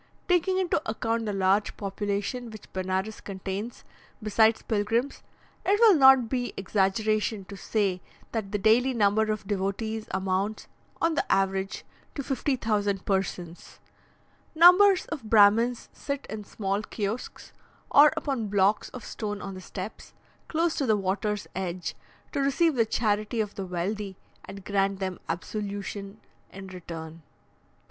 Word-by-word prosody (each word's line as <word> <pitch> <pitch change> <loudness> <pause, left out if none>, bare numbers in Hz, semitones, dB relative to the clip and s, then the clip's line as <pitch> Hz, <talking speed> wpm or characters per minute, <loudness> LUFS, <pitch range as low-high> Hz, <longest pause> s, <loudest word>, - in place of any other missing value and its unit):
Taking 360 +1 +2
into 370 -5 +1
account 225 0 -1
the - - 0
large 195 +1 +1
population 205 +4 -3
which 215 -2 -12
Benares 190 +3 -2
contains, 195 +3 -5 0.4
besides 220 +1 +3
pilgrims, 225 +5 -1 0.4
it 405 +2 +2
will 455 -3 +8
not 265 -5 +7
be 245 -2 -2
exaggeration 205 +2 0
to 200 - -9
say 195 -3 -1 0.3
that 215 -4 -3
the 210 - 0
daily 240 +6 +3
number 215 0 +3
of 215 -1 -4
devotees 210 +3 -2
amounts, 190 +3 -2 0.3
on 330 0 +2
the - - -1
average, 195 +1 0 0.3
to 280 - -3
50,000 220 -8 -1
persons. 180 -3 -3 0.8
Numbers 365 +4 +7
of 300 -8 -6
Brahmins 225 +3 +4
sit 280 -1 -4
in 215 -1 -6
small 195 0 -2
kiosks, 215 +2 -5 0.4
or 295 +1 +8
upon 270 -8 -2
blocks 200 +1 +2
of 250 - -9
stone 205 -2 -4
on 195 -1 -6
the 185 - -8
steps, 190 +3 -8 0.3
close 330 0 +1
to 275 - 0
the 215 -1 +4
water's 205 +2 -1
edge, 180 -1 -3 0.4
to - - -2
receive 280 +4 +2
the 230 -4 +2
charity 215 +1 0
of 210 -2 -1
the 195 -2 -5
wealthy, 190 +2 -3 0.3
and 195 -1 -10
grant 195 -1 +1
them 185 -2 -3
absolution 200 +3 -5 0.3
in 195 0 -9
return. 165 -3 -8
210 Hz, 140 wpm, -27 LUFS, 195-235 Hz, 0.8 s, will